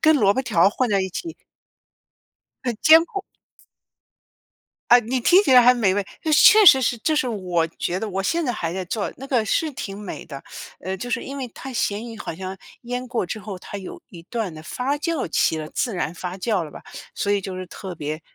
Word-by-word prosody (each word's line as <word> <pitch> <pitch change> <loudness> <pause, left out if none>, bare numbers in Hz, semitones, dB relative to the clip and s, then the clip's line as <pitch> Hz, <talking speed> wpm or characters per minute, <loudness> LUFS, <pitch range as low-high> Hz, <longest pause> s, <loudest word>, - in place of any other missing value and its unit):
跟 315 -1 +5
萝 200 -7 +4
卜 260 - -1
条 225 -10 +1
儿 195 - +6
混 255 +3 0
在 200 -2 +2
一 190 - -4
起。 330 - -6 1.3
很 240 -3 -1
艰 320 +1 +7
苦。 390 +3 -6 1.7
啊， 245 - +9
你 245 +2 -2
听 365 +10 +5
起 270 - +2
来 250 - +9
还 250 +1 +7
美 200 -6 +2
味。 205 0 0 0.2
那 315 - 0
确 425 +8 +8
实 265 -6 +9
是 240 0 +1
这 310 +7 0
是 280 - +1
我 180 -7 -1
觉 175 +2 -3
得 220 - -4
我 195 0 -2
现 335 - 0
在 250 - 0
还 170 -7 -3
在 190 -1 -3
做， 205 +3 -3
那 270 - -9
个 250 -5 +1
是 310 +9 0
挺 200 -5 -6
美 205 -3 -7
的。 140 -3 -9 0.4
呃， 190 +2 -4
就 245 +6 -6
是 - - -1
因 275 +1 -7
为 255 -3 -4
它 265 +3 -9
咸 215 -1 -1
鱼 225 - -9
好 165 - -5
像 190 +2 -6 0.3
腌 245 +1 -4
过 230 -5 -1
之 200 - -5
后， 200 -2 -7
它 200 - -8
有 190 - -9
一 170 -2 -12
段 225 -5 -3
的 155 0 -10
发 255 - -2
酵 325 -1 -2
期 160 - +1
了 155 -1 -5
自 240 -5 -2
然 175 -2 -2
发 180 +1 -6
酵 195 -2 0
了 150 - -10
吧， - - -11 0.3
所 205 - 0
以 200 - +1
就 190 -1 -6
是 185 0 -6
特 185 +1 -8
别 155 0 -5
215 Hz, 250 characters per minute, -22 LUFS, 185-255 Hz, 1.7 s, 啊